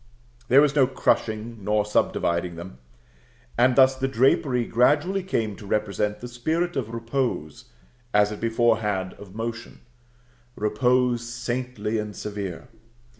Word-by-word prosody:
There 135 +3 +6
was 145 -1 +2
no 135 -3 +5
crushing 110 -4 -1
nor 105 +1 +1
subdividing 85 -4 0
them. 85 -5 -10 0.8
And 125 +1 +4
thus 130 -1 +6
the 130 0 -1
drapery 130 -1 +2
gradually 150 +12 +2
came 115 - -2
to 105 - -11
represent 105 0 -1
the 120 - -6
spirit 160 +9 -2
of 125 -5 -2
repose 115 - -3 0.5
as 105 0 +3
it 105 - -6
before 115 0 +2
had 95 -4 -2
of 100 -1 -12
motion, 115 +1 -6 0.7
repose 125 +2 +1
saintly 120 -3 -3
and 105 -1 -5
severe. 100 -5 -6
115 Hz, 130 wpm, -24 LUFS, 105-130 Hz, 0.8 s, There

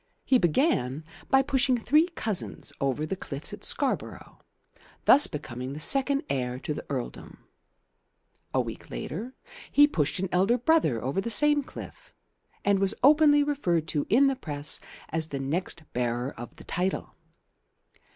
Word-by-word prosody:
He 255 - +4
began 160 - +1 0.3
by 270 0 +5
pushing 265 -1 +2
three 300 +8 +3
cousins 215 -5 -4
over 140 +2 0
the 175 - -3
cliffs 150 +2 -5
at 205 - -9
Scarborough, 275 -3 -2 0.7
thus 290 - +7
becoming 130 -3 -6
second 275 - +2
heir 125 -2 -2
to 150 - -3
the - - -6
earldom. 130 -4 -6 1.1
A - - +1
week - - -8
later 190 - -6 0.4
he 290 - +7
pushed 155 - -1
an 190 +1 -2
elder 195 +7 +3
brother 250 - +2
over 135 +10 -1
the 235 - -4
same 295 +6 +5
cliff, - - -11 0.5
and 200 -1 +3
was 195 -1 +2
openly 290 +1 +6
referred 180 - 0
to 145 -2 0
in 250 +8 +5
the 270 -1 +2
Press 145 - -2 0.3
as 160 0 0
the 140 -3 -5
next 160 +4 -2
bearer 120 +2 -1
of 120 0 -9
the - - -13
title. 185 +2 -2
190 Hz, 150 wpm, -27 LUFS, -, 1.1 s, thus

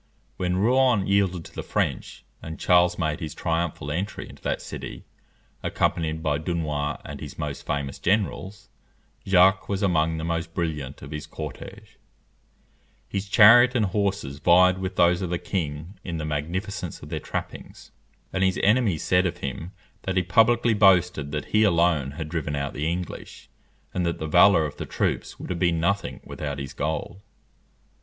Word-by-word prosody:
When 90 0 -1
Rouen 120 0 +3
yielded 95 -4 +1
to - - -13
the - - -5
French, - - -2 0.2
and 80 0 -8
Charles 90 0 +4
made 75 -1 -1
his 80 -1 -6
triumphal 80 -3 -2
entry 95 +7 -4
into - - -14
that - - -1
city, - - -8 0.6
accompanied 80 -1 -1
by 75 -2 0
Dunois 75 -4 -2
and - - -7
his - - -8
most 75 -2 -5
famous 70 -1 -3
generals, 100 - -1 0.6
Jacques 95 +1 +4
was 100 0 -1
among 80 -4 +2
the 80 - -4
most 85 0 -3
brilliant 75 -6 -3
of 70 - -9
his 75 -1 -6
cortège. 75 -4 -9 1.1
His 100 0 -4
chariot 120 +5 +7
and 110 -3 +3
horses 100 -8 -2
vied 90 +3 +5
with 95 0 -4
those 85 +1 +3
of 90 - -2
the 90 - 0
king 85 +1 -4
in 85 -3 -4
the 75 - -4
magnificence 85 +5 -4
of - - -9
their - - -3
trappings; - - -7 0.4
and 95 - +1
his 95 -1 +1
enemies 105 -6 +3
said 90 0 +3
of 85 0 -4
him 80 +3 -5 0.3
that 95 0 -2
he 90 - +3
publicly 115 +6 +3
boasted 90 -7 +3
that 75 -1 -3
he 105 - +5
alone 85 -8 +2
had 80 -2 -4
driven 75 -2 -3
out 70 -1 -3
the 75 +3 -1
English, 90 0 -7 0.4
and 90 - -1
that 85 - -1
the 80 - -4
valour 80 +1 +5
of 70 - -6
the - - -6
troops - - -2
would - - -6
have 85 - -3
been 85 -2 +2
nothing 85 -7 -1
without 70 -2 -5
his 70 -2 -6
gold. 80 +5 -3
85 Hz, 170 wpm, -25 LUFS, 75-95 Hz, 1.1 s, chariot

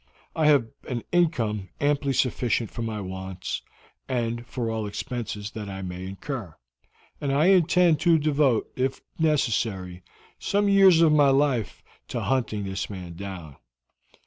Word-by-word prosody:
I 155 -2 +2
have 145 -5 +5 0.2
an 120 -3 -3
income 115 - +1
amply 145 -1 +1
sufficient 120 -3 0
for 120 - -6
my 110 -2 -3
wants, 95 -1 -5 0.5
and 120 -1 -2
for 120 -2 -3
all 110 -1 -2
expenses 110 -2 -5
that 105 -2 -6
I 95 0 -6
may 90 0 -6
incur, 100 - -6 0.7
and 140 - -1
I 150 +6 +4
intend 175 -3 +4
to 170 0 +4
devote, 145 -6 +1
if 130 +1 -1 0.2
necessary, 110 - 0 0.4
some 205 +1 +1
years 195 -4 +6
of 165 -2 +6
my 145 -2 +5
life 135 -6 +1 0.2
to - - -3
hunting 115 -6 -1
this 95 -1 -4
man 90 -4 -7
down. 90 -5 -8
120 Hz, 145 wpm, -25 LUFS, 100-150 Hz, 0.7 s, years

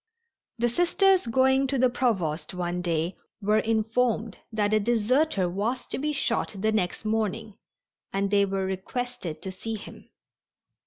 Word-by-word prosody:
The 240 +1 +2
Sisters 355 - +3
going 265 +3 +3
to 270 +1 0
the 255 0 +5
Provost 190 -10 -1
one 180 0 -2
day 170 0 -1 0.2
were 210 +1 +2
informed 225 0 0
that 215 -1 +1
a 215 - +5
deserter 235 - +2
was 210 +8 -2
to - - -3
be 300 +2 0
shot 235 -6 -1
the 215 +3 +1
next 215 0 -1
morning, 220 0 -1 0.6
and 195 0 -1
they 200 -1 +4
were 195 -1 -1
requested 190 -2 -4
to 190 - -4
see 220 +4 -5
him. 210 - -11
220 Hz, 150 wpm, -27 LUFS, 190-245 Hz, 0.6 s, the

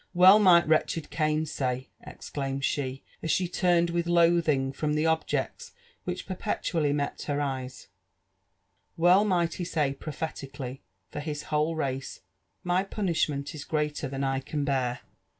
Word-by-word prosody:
'' - - -45
Well 190 +3 +10
might 175 -5 +6
wretched 160 0 +1
Gain 155 0 +1
say," 130 -4 -3
exclaimed 135 -1 -4
she, 135 -2 -2 0.2
as 160 - -4
she 180 +3 +2
turned 175 -1 +2
with 170 0 -1
loathing 165 -6 +3
from 150 +2 -1
tbe 155 +1 +1
objects 160 0 -1 0.3
which 180 0 -4
perpetually 165 -5 -1
met 145 0 -2
her 145 -1 0
eyes, 130 -2 -4 0.4
— - - -48
'' - - -48 0.3
well 175 +4 +5
might 175 -5 +1
he 180 - -4
say 150 -5 0
prophetically 140 -3 -6 0.3
for - - -5
his 150 0 -4
whole 155 +2 +2
race, 135 -3 -3 0.2
/ - - -48
My 185 +2 +3
punUhment 165 -8 -1
is 150 -2 -7
greater 150 -2 -1
than 135 +1 -4
I 135 0 0
can 145 +2 -3
bear 125 -3 0
150 Hz, 160 wpm, -28 LUFS, 140-170 Hz, 0.4 s, Well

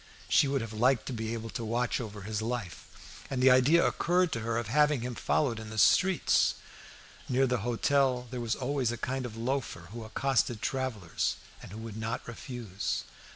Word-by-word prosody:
She 145 - +4
would 135 -1 0
have 115 -1 -6
liked 120 +2 +2
to 130 - -4
be 110 -1 -3
able 115 -1 -6
to 115 - -4
watch 120 +3 0
over 105 -3 -7
his 105 +1 -3
life; 115 -5 -6
and 135 - -2
the 130 +1 +6
idea 135 +7 +5
occurred 180 0 +2
to 115 - -2
her 115 0 -1
of 120 - -1
having 150 +3 +3
him 125 +1 -3
followed 120 -1 0
in 110 -1 -8
the 110 - -7
streets. 185 - +4 0.7
Near 130 +1 +3
the 125 -2 0
hotel 125 +2 +1
there 125 -2 -4
was 115 0 0
always 130 -2 -1
a 120 - -4
kind 130 +2 -2
of 110 -1 -10
loafer 115 -8 -3
who 115 0 -7
accosted 120 0 0
travellers, 120 -9 -2 0.3
and - - -11
who 105 - -8
would 110 -1 -7
not 110 +1 -4
refuse. 120 -5 -4
120 Hz, 195 wpm, -30 LUFS, 110-130 Hz, 0.7 s, the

